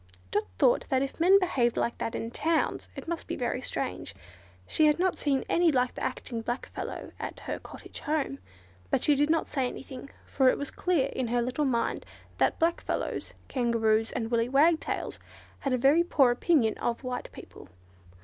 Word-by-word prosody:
Dot -, -, +1 dB
thought 240 Hz, -, +3 dB
that 265 Hz, 0 st, +2 dB
if 275 Hz, -, -5 dB
men 370 Hz, +4 st, +7 dB
behaved 265 Hz, -11 st, +1 dB
like 235 Hz, -, -1 dB
that 230 Hz, -, -2 dB
in 230 Hz, -, -4 dB
towns 325 Hz, +5 st, 0 dB
it -, -, -8 dB
must 335 Hz, 0 st, -4 dB
be -, -, -3 dB
very 250 Hz, +1 st, -2 dB
strange. 95 Hz, -, -4 dB, 0.5 s
She 310 Hz, -, +3 dB
had 300 Hz, -, +3 dB
not 370 Hz, +1 st, +1 dB
seen 275 Hz, -3 st, +1 dB
any 345 Hz, -1 st, +3 dB
like 250 Hz, -2 st, +1 dB
the -, -, -6 dB
acting 230 Hz, -2 st, -3 dB
black 240 Hz, +3 st, -3 dB
fellow -, -, -6 dB
at -, -, -6 dB
her -, -, -4 dB
cottage -, -, -10 dB
home. 295 Hz, -, -1 dB, 0.5 s
But -, -, +1 dB
she 295 Hz, -, +4 dB
did 290 Hz, +2 st, +2 dB
not 325 Hz, 0 st, +2 dB
say 265 Hz, -3 st, 0 dB
anything, 265 Hz, +1 st, -8 dB, 0.2 s
for 265 Hz, -2 st, +3 dB
it -, -, +1 dB
was 285 Hz, -, -4 dB
quite -, -, -17 dB
clear 345 Hz, -7 st, +3 dB
in 260 Hz, -3 st, -2 dB
her 240 Hz, +1 st, +1 dB
little 255 Hz, +5 st, -1 dB
mind 240 Hz, -4 st, 0 dB, 0.4 s
that -, -, +2 dB
black 335 Hz, +1 st, +1 dB
fellows, -, -, -3 dB
Kangaroos, 225 Hz, -3 st, +1 dB
and 230 Hz, -2 st, -3 dB
willy 235 Hz, 0 st, +2 dB
wagtails 310 Hz, +5 st, +2 dB, 0.4 s
had 275 Hz, -, -2 dB
a 255 Hz, -, +2 dB
very 280 Hz, +7 st, +5 dB
poor 275 Hz, -7 st, +4 dB
opinion 240 Hz, -3 st, +2 dB
of 235 Hz, +2 st, -2 dB
white 250 Hz, -1 st, -4 dB
people. -, -, -12 dB
265 Hz, 195 wpm, -28 LUFS, 240-310 Hz, 0.5 s, men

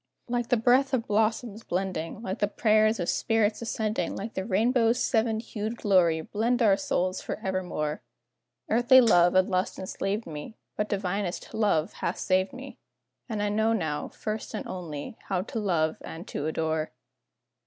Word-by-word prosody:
Like 240 Hz, -1 st, -1 dB
the 245 Hz, -, +4 dB
breath 255 Hz, +4 st, +3 dB
of 230 Hz, -2 st, -2 dB
blossoms 220 Hz, +1 st, 0 dB
blending, 185 Hz, +2 st, -3 dB
Like 190 Hz, -1 st, -4 dB
the 205 Hz, -, +2 dB
prayers 215 Hz, +1 st, +3 dB
of 175 Hz, -, -2 dB
saints 225 Hz, -1 st, +1 dB
ascending, 220 Hz, -1 st, -2 dB
Like 220 Hz, +4 st, -5 dB
the 190 Hz, -, -2 dB
rainbow's 230 Hz, +3 st, +2 dB
seven 225 Hz, -3 st, +1 dB
hued 220 Hz, 0 st, -4 dB
glory, 175 Hz, -7 st, +3 dB
blend 235 Hz, +7 st, 0 dB
our 205 Hz, -3 st, +6 dB
souls 185 Hz, -1 st, -1 dB
forevermore; 180 Hz, -6 st, -3 dB, 0.7 s
Earthly 245 Hz, +3 st, +6 dB
love 175 Hz, -7 st, +5 dB
and 185 Hz, 0 st, +5 dB
lust 185 Hz, -1 st, -1 dB
enslaved 195 Hz, +3 st, -3 dB
me, 155 Hz, +7 st, -8 dB, 0.2 s
But 210 Hz, 0 st, -2 dB
divinest 195 Hz, -2 st, -2 dB
love 205 Hz, -5 st, +1 dB
hath -, -, -3 dB
saved 185 Hz, 0 st, +1 dB
me, 265 Hz, +2 st, -10 dB, 0.5 s
And 215 Hz, -2 st, -2 dB
I 205 Hz, -, +1 dB
know 220 Hz, +2 st, +2 dB
now, 160 Hz, -9 st, -2 dB
first 215 Hz, +1 st, -5 dB
and -, -, -4 dB
only, 170 Hz, +1 st, -6 dB
how 185 Hz, -2 st, 0 dB
to 225 Hz, -, -4 dB
love 165 Hz, -6 st, +1 dB
and 170 Hz, +6 st, -8 dB
to 145 Hz, -, -3 dB
adore. 160 Hz, 0 st, -1 dB
205 Hz, 160 wpm, -27 LUFS, 185-225 Hz, 0.7 s, our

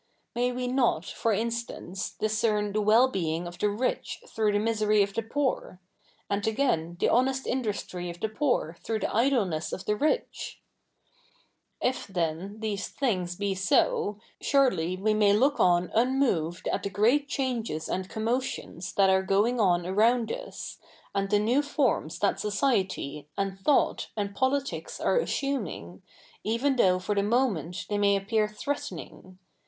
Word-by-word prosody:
May 245 Hz, +1 st, +1 dB
we 250 Hz, 0 st, -3 dB
7iot, 250 Hz, -1 st, +1 dB
for 230 Hz, -, 0 dB
insta?ice, 225 Hz, -4 st, -3 dB
discern 215 Hz, -1 st, 0 dB
the 215 Hz, -, +1 dB
zuell 230 Hz, +5 st, +5 dB
being 165 Hz, -2 st, -1 dB
of 175 Hz, +1 st, -8 dB
the 210 Hz, -, +2 dB
rich 245 Hz, -, -2 dB
through 215 Hz, -, 0 dB
the -, -, +3 dB
misery 215 Hz, -1 st, +2 dB
of 200 Hz, 0 st, -4 dB
tlie 225 Hz, 0 st, -4 dB
poor 265 Hz, -10 st, -1 dB, 0.5 s
1 200 Hz, -, -1 dB
and 205 Hz, -, -3 dB
again, 175 Hz, -9 st, 0 dB
the -, -, +3 dB
honest 265 Hz, +2 st, +2 dB
industry 205 Hz, -7 st, -3 dB
of 170 Hz, 0 st, -8 dB
the 220 Hz, -, 0 dB
poor 220 Hz, -, 0 dB
th7'ough 220 Hz, -2 st, -2 dB
the -, -, -2 dB
idleness 220 Hz, -, +1 dB
of 190 Hz, -, -5 dB
the 210 Hz, -, +1 dB
rich? 310 Hz, -, -1 dB, 0.6 s
' -, -, -34 dB, 0.6 s
If, 255 Hz, +1 st, 0 dB
then, 180 Hz, +2 st, -3 dB
these 205 Hz, -2 st, -2 dB
things 185 Hz, -10 st, -1 dB
be 200 Hz, +1 st, -1 dB
so, 195 Hz, +2 st, +2 dB, 0.2 s
surely 215 Hz, -, +2 dB
we 215 Hz, +3 st, +1 dB
may 210 Hz, -1 st, +4 dB
look 270 Hz, +7 st, +3 dB
on 175 Hz, 0 st, +3 dB
un 250 Hz, +4 st, +2 dB
moved 175 Hz, -, 0 dB
at -, -, -1 dB
the 200 Hz, -, -3 dB
great 235 Hz, +9 st, +2 dB
changes 240 Hz, -, -2 dB
and 185 Hz, 0 st, -3 dB
commotions 225 Hz, -6 st, -3 dB
that 195 Hz, -1 st, +4 dB
are 190 Hz, 0 st, +4 dB
going 205 Hz, +6 st, +2 dB
on 175 Hz, -4 st, +3 dB
around 225 Hz, +5 st, +2 dB
us, -, -, -6 dB, 0.3 s
a?id 195 Hz, 0 st, -1 dB
tJie 205 Hz, 0 st, +3 dB, 0.2 s
7iew -, -, +1 dB
forms 270 Hz, -, 0 dB
that 200 Hz, -, +1 dB
society, 195 Hz, -, -1 dB
and 195 Hz, -1 st, -2 dB
thought, 280 Hz, +8 st, +2 dB
and 200 Hz, -1 st, -2 dB
politics 270 Hz, +5 st, -1 dB
are -, -, +2 dB
assunmig, 225 Hz, -, -3 dB, 0.4 s
even 235 Hz, +6 st, +1 dB
although 190 Hz, -8 st, +4 dB
for 185 Hz, +3 st, -2 dB
the 200 Hz, -, +2 dB
moment 205 Hz, -, 0 dB
they 205 Hz, -1 st, -1 dB
may 200 Hz, 0 st, +4 dB
appear 210 Hz, +2 st, +1 dB
threateni?ig. 195 Hz, -, -6 dB
210 Hz, 160 wpm, -28 LUFS, 190-245 Hz, 0.6 s, zuell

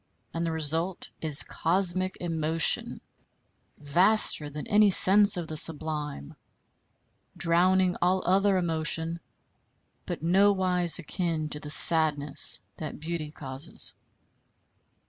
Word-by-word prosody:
And 165 Hz, -, -5 dB
the 165 Hz, -, -3 dB
result 160 Hz, +3 st, 0 dB
is 150 Hz, -2 st, +2 dB
cosmic 185 Hz, +2 st, -2 dB
emotion 165 Hz, -2 st, -1 dB, 0.8 s
vaster 165 Hz, +1 st, 0 dB
than 150 Hz, 0 st, -9 dB
any 210 Hz, 0 st, +2 dB
sense 200 Hz, +2 st, +7 dB
of 170 Hz, -2 st, -6 dB
the 155 Hz, -, -8 dB
sublime, 150 Hz, -, -4 dB, 1.0 s
drowning 180 Hz, +2 st, 0 dB
all 185 Hz, +1 st, -1 dB
other 195 Hz, +2 st, 0 dB
emotion, 165 Hz, -1 st, 0 dB, 0.9 s
but -, -, -7 dB
nowise 185 Hz, -1 st, +2 dB
akin 165 Hz, -2 st, -5 dB
to 150 Hz, -, -5 dB
the 150 Hz, -, -11 dB
sadness 150 Hz, -2 st, +3 dB, 0.2 s
that 155 Hz, -3 st, -9 dB
beauty 160 Hz, -1 st, -7 dB
causes. 135 Hz, 0 st, -2 dB
165 Hz, 105 wpm, -25 LUFS, 155-185 Hz, 1.0 s, sense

